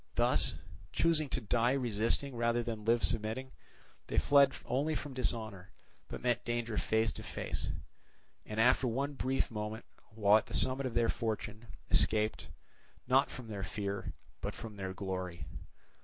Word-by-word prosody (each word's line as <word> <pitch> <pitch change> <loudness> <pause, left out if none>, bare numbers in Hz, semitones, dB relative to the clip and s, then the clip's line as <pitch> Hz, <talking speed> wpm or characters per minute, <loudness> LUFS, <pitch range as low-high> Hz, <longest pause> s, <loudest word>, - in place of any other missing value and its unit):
Thus - - +3 0.4
choosing 160 -3 +2
to - - 0
die 120 +3 +2
resisting, 120 +1 0
rather 120 0 +1
than 115 -2 -3
to 115 - +3
live 120 0 +2
submitting, 115 +4 0 0.6
they - - -3
fled 140 -1 +6
only 145 +5 0
from 145 -2 -4
dishonour, 110 -7 -2 0.4
but - - -7
met 120 -1 +1
danger 120 -1 -2
face 110 0 +2
to - - -8
face, - - -3 0.7
and 105 0 -5
after 125 +2 +5
one 135 +5 -1
brief 135 -2 0
moment, 105 +1 -4 0.2
while 105 -1 +5
at - - -11
the - - -4
summit 130 +1 +2
of 120 - -6
their 120 -1 +4
fortune, 110 0 -3 0.2
escaped, 110 0 +2 0.6
not 135 +2 +4
from 125 -3 -8
their 105 -3 -5
fear, 100 +1 -3 0.3
but - - -3
from 110 -3 -8
their 95 -1 -4
glory. 90 -4 -4
115 Hz, 155 wpm, -33 LUFS, 105-130 Hz, 0.7 s, fled